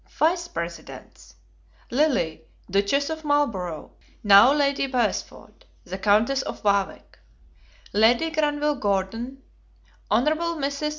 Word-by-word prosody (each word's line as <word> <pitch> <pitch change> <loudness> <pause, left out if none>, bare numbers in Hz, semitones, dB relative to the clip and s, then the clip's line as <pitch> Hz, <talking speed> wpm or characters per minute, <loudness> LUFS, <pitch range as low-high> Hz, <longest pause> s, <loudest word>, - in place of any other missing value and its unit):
Vice 340 +2 0
presidents. 170 - -9 0.6
Lily, 245 - 0 0.3
Duchess 240 +10 +1
of 315 0 -6
Marlborough, 230 - -1 0.3
now 205 +4 +7
Lady 280 -1 +1
Wm. - - -12
Beresford; 245 - -3 0.2
the 190 +2 -7
Countess 220 +7 +2
of - - -7
Warwick; 200 -2 -1 0.7
Lady 235 +9 +3
Granville 295 -1 0
Gordon; 225 +6 -2 0.7
Hon. 225 +4 +2 0.3
Mrs. 280 +1 -2
250 Hz, 105 wpm, -24 LUFS, 200-290 Hz, 0.7 s, now